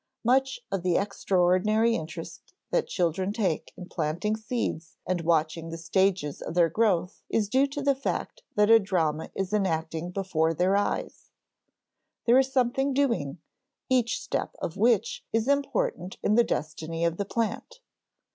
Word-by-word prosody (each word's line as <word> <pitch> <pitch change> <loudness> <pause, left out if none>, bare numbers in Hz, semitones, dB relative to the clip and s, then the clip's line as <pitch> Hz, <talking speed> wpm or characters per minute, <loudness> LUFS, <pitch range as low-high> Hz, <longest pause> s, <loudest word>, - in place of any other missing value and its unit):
Much 265 +2 +2
of 195 -2 -1
the 180 -1 +2
extraordinary 200 +3 +2
interest 165 - -7 0.2
that - - +1
children 185 +2 0
take 205 -7 -1
in 180 - -7
planting 175 +7 -1
seeds 220 -7 -4
and 180 -1 -1
watching 165 0 0
the 165 - -5
stages 175 -3 0
of 160 - -6
their 170 -2 +4
growth 185 -2 +1
is 215 -2 +1
due 265 +6 +3
to 285 +1 -5
the 280 0 +4
fact 270 +1 -4
that 210 +1 +4
a 225 - +9
drama 165 -6 -1
is 195 +1 -3
enacting 165 -4 -1
before 175 -4 0
their 185 +4 +2
eyes; 205 0 -2 1.0
there 245 +2 +6
is 265 0 +1
something 265 +1 +1
doing, 230 - 0 0.5
each 245 -2 +2
step - - -3
of 165 - -4
which 470 - +2
is 225 +1 0
important 280 - 0
in 210 - +2
the 235 +2 +6
destiny 160 -1 -3
of 170 0 0
the 200 - 0
plant. 225 - -3
195 Hz, 155 wpm, -27 LUFS, 165-235 Hz, 1.0 s, a